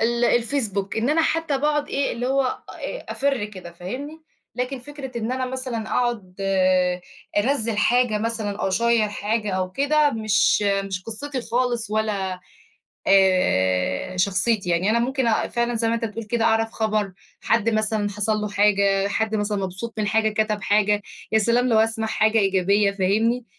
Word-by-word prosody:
ال 235 +1 +1
الفيسبوك، 225 -6 0
إن 230 +5 +1
أنا 325 +2 +3
حتى 320 -3 0
باقعد 295 +1 0
إيه 275 0 -1
اللي 245 +1 -3
هو 270 +1 +2
أ 270 - -5
أفِر 270 -5 0
كده 185 -5 -9
فاهمني؟ 265 - -7 0.3
لكن 250 +2 -3
فكرة 265 -1 -8
إن 230 +2 -2
أنا 255 0 -2
مثلًا 255 -4 -4
أقعد 235 -7 -1 1.0
أنزّل 230 -1 +1
حاجة 240 0 +2
مثلًا 220 -2 -2
أو - - 0
أشيّر 230 +2 +2
حاجة 210 +1 -2
أو 185 0 -1
كده 290 +4 +2
مش 215 -2 +2
مش 195 -2 -1
قِصتي 255 +6 -5
خالص، 240 -2 -1
ولا 200 -4 -1 0.7
آآ 185 - +2
شخصيتي، 200 +1 +1
يعني 175 +4 +2
أنا 230 - +3
ممكن 260 +2 0
أ 225 -1 +2
فعلًا 235 0 -1
زي 230 0 +1
ما 230 - +1
أنت 230 - -2
بتقول 225 +1 -5
كده 225 +2 -1
أعرف 225 0 +2
خبر، 215 -3 -1 0.3
حد 230 -1 +1
مثلًا 215 -1 +1
حصل 210 +1 -1
له 210 0 -2
حاجة، 200 -1 +2
حد 220 +1 -1
مثلًا 205 -1 -1
مبسوط 190 +4 -5
من 210 - 0
حاجة، 220 +1 +2
كتب 215 0 0
حاجة، 210 +1 +2 0.3
يا 220 - +5
سلام 235 +3 +2
لو 230 - +3
هاسمع 225 0 +1
حاجة 220 0 +2
إيجابية 200 +1 +2
فاهمني؟ 220 +5 +1
220 Hz, 165 wpm, -23 LUFS, 200-240 Hz, 1.0 s, يا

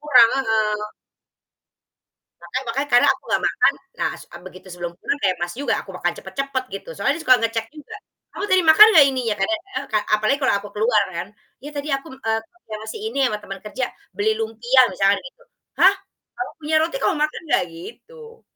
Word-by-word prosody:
Kurang, 255 -6 +6 0.2
heeh. 210 -1 0 1.5
Makanya 255 +1 -4
makanya 285 +2 -2
kadang 245 - +6
aku - - -15
gak - - +2
makan - - +3 0.3
nah - - +1
s - - -12
eee, - - -10
begitu 185 +1 -12
sebelum 175 -1 -5
pulang - - -2
kayak 185 -2 +1
pas 175 0 -3
juga 285 - 0
aku - - -16
makan - - -1
cepat-cepat 275 - -4
gitu 195 - -7
soalnya 270 +8 +1
dia - - -8
suka 255 -1 +6
ngecek 225 0 -1
juga 310 +9 -11 0.4
"kamu - - -3
tadi 370 -2 +4
makan 425 +7 +10
gak 285 - +9
ini 260 -1 -2
ya?" - - +1
Katan 330 +11 0 0.2
eee, 240 -6 -1
apalagi 215 +6 +1
kalau 260 - +2
aku 205 +1 -8
keluar 215 0 +2
kan, 170 +2 -4 0.3
"Iya 290 - -8
tadi 285 +1 -4
aku, 275 +3 -3
eee, 225 -4 -1 0.3
ketemu 215 0 -7
si - - -7
ini 445 - -6
sama 210 - -2
teman 195 0 -8
kerja 250 +5 -2 0.3
beli 215 +2 +2
lumpia." 225 +4 +2
Misalnya 195 +2 +2
gitu, - - -19 0.4
"Hah 390 - +7 0.5
kamu 370 - -3
punya 315 0 -1
roti 325 +8 -1
kamu 380 - +1
makan 305 +4 -2
gak?" - - +4
Gitu. 455 - -13
245 Hz, 195 wpm, -21 LUFS, 210-295 Hz, 1.5 s, makan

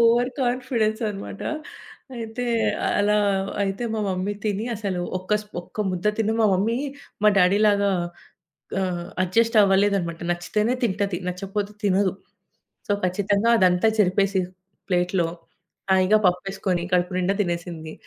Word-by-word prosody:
Over 240 +2 +4
confidence 245 -3 0
అన్నమాట 200 -1 -7 0.7
అయితే 230 +1 -4 0.5
అలా 205 +1 +3 0.5
అయితే 195 +4 -2
మా 220 - -1
మమ్మీ 185 +2 -1
తిని 210 0 -1
అసలు 200 -4 -3 0.2
ఒక్క 185 +3 0
స్ - - -18 0.2
ఒక్క 210 +4 -5
ముద్ద 185 +2 -3
తిని 220 0 +1
మా 220 - +5
మమ్మీ 215 +5 +1 0.5
మా 215 - +7
డ్యాడీ 190 +1 +5
లాగా 200 -1 +3 0.9
ఆహ్, 175 -2 -2 0.2
అడ్జస్ట్ 225 +5 +2
అవ్వలేదన్నమాట. 195 -4 +2
నచ్చితేనే 210 +7 0
తింటది. 200 -3 0
నచ్చకపోతే 195 +3 -3
తినదు. 195 -1 +2 0.7
సో - - +1
ఖచ్చితంగా 200 +4 +1
అదంతా 180 +2 +4
చెరిపేసి 195 0 +2 0.5
ప్లేట్‌లో 180 -1 +1 0.6
హాయిగా 190 +3 +4
పప్పేసుకొని, 180 0 0
కడుపు 180 0 +2
నిండా 185 +2 +1
తినేసింది. 170 -3 -4
195 Hz, 125 wpm, -24 LUFS, 180-215 Hz, 0.9 s, మా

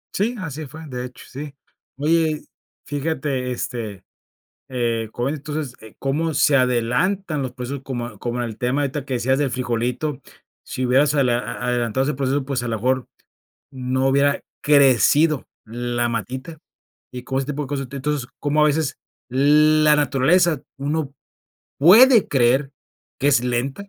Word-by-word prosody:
Sí, 225 +5 0
así 155 -5 -6
fue, 160 +4 -10
de 125 -4 -5
hecho, 125 -1 -11
sí. 145 +1 -8 0.4
Oye, 155 +1 +1 0.4
fíjate, 145 -3 -2
este, 115 -5 -5 0.7
eh, 115 -3 -1
cómo 120 +3 -2
entonces, 150 -2 -4
eh, 110 -1 -14
cómo 155 +3 -1
se 150 0 +4
adelantan 130 +8 +1
los 130 -2 -4
procesos 130 +2 -5
como 120 -5 -5
como 120 0 -2
el 115 -2 -5
tema 125 +4 0
ahorita 145 0 -2
que 130 -1 -3
decías 130 +3 +1
del 145 -2 +1
frijolito, 125 +3 -2 0.4
si 130 - -3
hubieras 140 +4 +3
adela 125 -4 +2
a 125 0 -5
adelantado 120 +1 0
ese 150 +3 -1
proceso, 135 +1 -1
pues, 135 -2 -2
a 120 - -4
la 115 - -1
mejor 130 +3 0 0.6
no 130 0 -1
hubiera 140 +1 +2 0.2
crecido 145 +1 +4 0.2
la 120 +1 -2
matita, 130 +7 -5 0.5
y 125 -1 -6
como 130 +1 -3
ese 135 - -3
tipo 145 +1 -4
de - - -7
cosas. 135 -1 -3
Entonces, 140 -1 -2
cómo 150 +1 +1
a - - +6
veces 150 -1 0 0.3
la 150 +3 +4
naturaleza 150 +4 +3 0.2
uno 145 0 -2 0.7
puede 220 - +7
creer 135 +1 +2 0.5
que 140 - 0
es 135 -4 +4
lenta, 130 +10 -2
135 Hz, 155 wpm, -22 LUFS, 125-150 Hz, 0.7 s, puede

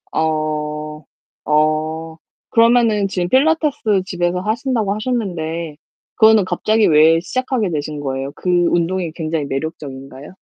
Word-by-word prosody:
어. 155 -1 -2 0.4
어. 155 +2 0 0.3
그러면은 230 -3 +3
지금 180 -2 -2
필라테스 280 - +2
집에서 175 -1 -1
하신다고 220 0 -1
하셨는데 170 -9 -3 0.4
그거는 220 -2 +5
갑자기 215 +3 +1
왜 160 +1 +5
시작하게 255 +1 -2
되신 150 -1 -4
거예요? 135 0 -4
그 180 - -4
운동이 175 0 +1
굉장히 160 -2 -3
매력적인가요? 135 -1 -6
170 Hz, 300 characters per minute, -18 LUFS, 155-215 Hz, 0.4 s, 그거는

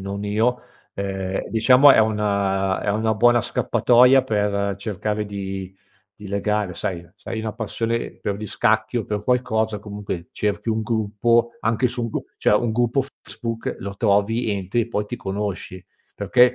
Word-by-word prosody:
non 100 +1 -5
io, 110 +4 +1 0.3
ehm, 95 -1 -3
diciamo 125 +5 +6
è - - +4
una 100 -3 +1
è - - -3
una 110 +1 +1
buona 120 +2 +4
scappatoia 125 +4 +4
per 105 -4 0
cercare 105 +1 -3
di 95 -2 -6 0.4
di 105 -2 -11
legare, 100 -2 -1
sai, 85 0 -4
se - - -11
hai 110 - -2
una 110 -1 -3
passione 115 +1 -3
per 100 -1 -2
gli 110 +1 -6
scacchi 110 +2 +1
o 110 - -3
per 105 -1 -3
qualcosa, 110 -4 +1
comunque, 100 -4 -6
cerchi 105 +1 -2
un 110 0 0
gruppo 115 +2 +1
anche 115 +3 +1
su 120 0 -4
un 115 - -1
gru - - -3
cioè - - +2
un 110 +2 +2
gruppo 120 +3 +1 0.2
Facebook 115 -1 -5
lo 100 0 -6
trovi, 110 +2 +1
entri 100 +3 -1
e 115 - -6
poi 105 -3 -1
ti - - -5
conosci, 95 -2 -5 0.3
perché 125 0 +4
105 Hz, 165 wpm, -22 LUFS, 100-115 Hz, 0.4 s, diciamo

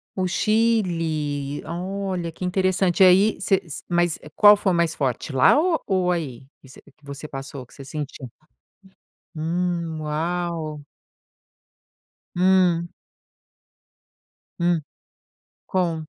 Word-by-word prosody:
o 185 -1 0
Chile, 165 -10 0
olha 185 0 -4
que 170 - -9
interessante 185 0 +2
aí 190 +4 +5
você 195 0 +1
s 160 -4 -8
mas 175 -2 +1 0.2
qual 205 0 +8
foi 200 -2 0
o 175 - +1
mais 170 -1 +1
forte, 135 +2 -2
lá 130 -1 +5
ou 340 -1 +1
ou 185 -2 +1
aí, 135 -7 -4
que 135 - -18
você 130 - -15
que 150 - -23
você 140 +2 -8
passou 135 -1 -7
que - - -22
você 135 - -10
sentiu? 145 -2 -6 1.1
Hum, 170 0 -2
uau. 160 0 -3 1.6
Hum. 180 -2 +3 1.7
Hum, 170 -1 +2 0.9
com. 170 -4 -1
170 Hz, 115 wpm, -23 LUFS, 155-185 Hz, 1.7 s, qual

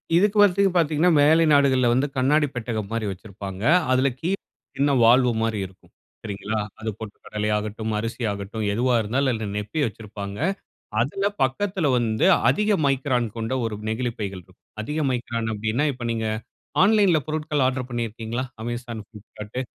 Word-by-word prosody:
இதுக்கு 205 +4 +3
வர்றதுக்கு 200 -1 +4
பாத்தீங்கன்னா, 165 +1 +3
மேலை 160 +3 +5
நாடுகள்ல 130 -3 +4
வந்து 130 +4 +2
கண்ணாடிப் 145 +2 +2
பெட்டகம் 110 -4 -3
மாரி 115 -1 -1
வச்சிருப்பாங்க. 95 0 -8 0.3
அதில 130 +1 +3
கீழ 185 +4 0 0.4
சின்ன 140 +1 +3
வால்வு 125 +2 +6
மாரி 110 -2 0
இருக்கும். 95 0 -23 0.3
சரிங்களா! 105 +1 -3 0.2
அது 110 0 -3
பொட்டுக் 110 -2 -9
கடலையாகட்டும், 105 +1 -2
அரிசி 115 +3 -4
ஆகட்டும், 100 +2 -5
எதுவா 125 +3 +1
இருந்தாலும் 130 +6 0
அதுல 110 -3 -3
நிரப்பி 105 +9 -4
வச்சிருப்பாங்க. 105 -2 -7 0.6
அதில 175 +11 -1 0.2
பக்கத்தில 175 +4 0
வந்து 110 -2 +1 0.2
அதிக 210 0 +2
மைக்ரான் 130 -3 +1
கொண்ட 115 +2 -2
ஒரு 110 -2 -3
நெகிழிப் 115 +1 -2
பைகள் 100 -3 -4
இருக்கும். - - -24 0.2
அதிக 150 +8 -3
மைக்ரான் 115 -2 -2
அப்பிடின்னா, 110 +7 0
இப்ப 125 -2 -7
நீங்க 110 -1 -2 0.6
ஆன்லைன்ல 200 -5 +4
பொருட்கள் 150 -2 -1
ஆர்ட்ரு 130 0 -1
பண்ணியிருக்கீங்களா? 115 0 -3 0.2
Amazon, 120 -1 -5
Flipcartடு. 105 +2 -8
120 Hz, 145 wpm, -24 LUFS, 110-145 Hz, 0.6 s, வால்வு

